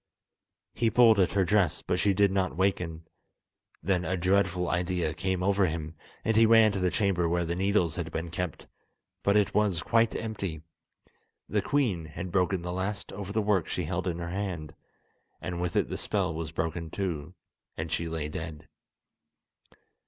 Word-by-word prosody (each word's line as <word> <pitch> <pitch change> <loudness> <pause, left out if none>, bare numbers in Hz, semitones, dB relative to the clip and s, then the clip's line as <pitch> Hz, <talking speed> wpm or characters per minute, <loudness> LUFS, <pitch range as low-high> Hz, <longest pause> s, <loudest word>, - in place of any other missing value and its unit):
He 115 - +2
pulled 115 -3 +6
at 95 - +3
her 100 -2 +3
dress, 95 -3 +2
but 90 - -1
she 100 +2 +3
did 100 0 +4
not 95 -4 0
waken. 90 -4 0 0.8
Then 90 0 +1
a 95 +1 -1
dreadful 90 0 +2
idea 90 -2 0
came 95 +1 -1
over 100 0 +3
him, 80 -1 -4 0.3
and 115 - +2
he 115 0 +6
ran 110 -1 +6
to 100 - -2
the 90 -1 +2
chamber 90 -4 +1
where 85 0 +1
the 85 +1 -2
needles 95 -3 +1
had 85 -2 -3
been 85 +1 -4
kept, 90 -3 -4 0.6
but 100 +1 +3
it 105 -2 +2
was 100 -6 +1
quite 115 -1 +2
empty. 100 -8 -4 0.8
The - - +1
queen 110 - 0
had 85 +4 -6
broken 90 -1 +1
the 90 0 -3
last 95 +3 -3
over 100 -1 -6
the 110 +1 0
work 100 -5 +2
she - - -2
held - - -2
in 85 -2 -1
her 85 0 -5
hand, 90 -6 -4 0.7
and 90 -1 -4
with 90 -2 -2
it - - +2
the - - -4
spell 95 -5 -1
was 80 0 -4
broken 80 0 -3
too, 90 -3 -4 0.4
and 80 0 -4
she 85 - -1
lay 80 -2 -3
dead. 80 0 -7
90 Hz, 180 wpm, -28 LUFS, 85-100 Hz, 0.8 s, pulled